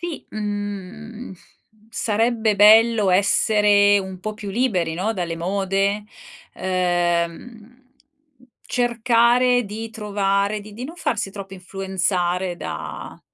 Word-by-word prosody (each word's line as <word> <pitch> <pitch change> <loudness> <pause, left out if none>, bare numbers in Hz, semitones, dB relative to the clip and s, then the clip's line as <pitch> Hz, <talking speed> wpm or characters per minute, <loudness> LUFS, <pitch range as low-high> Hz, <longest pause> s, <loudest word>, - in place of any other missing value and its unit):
Sì, 345 -3 -6
mhmm, 205 +2 -6 0.6
sarebbe 225 -1 0
bello 215 0 +6
essere 205 +1 +4
un 190 -1 -6
po' 215 +3 -5
più 210 -2 -7
liberi, 190 -8 0
no, 195 +6 -1
dalle 175 -5 -3
mode, 195 +3 -1 0.5
uhm, 180 +6 -2 0.9
cercare 240 +1 +2
di 220 +2 -6
trovare, 205 -1 -1
di 210 +1 -12
di 235 +5 -7
non 320 +6 -8
farsi 225 - -2
troppo 195 -1 -9
influenzare 185 -1 -2
da - - -7
205 Hz, 105 wpm, -22 LUFS, 190-225 Hz, 0.9 s, bello